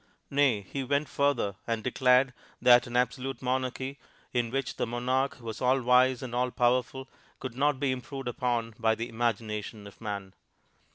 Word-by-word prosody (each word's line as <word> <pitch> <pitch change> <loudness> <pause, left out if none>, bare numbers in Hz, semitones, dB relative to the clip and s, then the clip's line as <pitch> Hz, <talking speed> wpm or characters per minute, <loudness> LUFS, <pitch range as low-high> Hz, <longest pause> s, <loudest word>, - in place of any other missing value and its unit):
Nay, 140 -7 +3
he 135 +8 -5
went 140 +3 0
further 125 -9 0
and 115 -2 -1
declared 125 +1 +3 0.3
that 120 -1 +6
an 120 0 -1
absolute 130 +2 -1
monarchy 130 +1 -2 0.3
in 120 -2 +1
which 135 +1 -3
the - - -1
monarch 130 +4 0
was 115 -2 -7
all 130 +1 +3
wise 125 +1 +4
and 125 -2 -6
all 125 +1 +1
powerful, 125 +2 +1 0.3
could 130 -3 -6
not 140 0 +2
be 140 -1 +1
improved 130 +1 -5
upon 120 -2 -1
by 110 -1 +3
the 115 +2 -4
imagination 110 -2 -2
of 100 - -13
man. 100 -3 -5
125 Hz, 165 wpm, -29 LUFS, 115-130 Hz, 0.3 s, that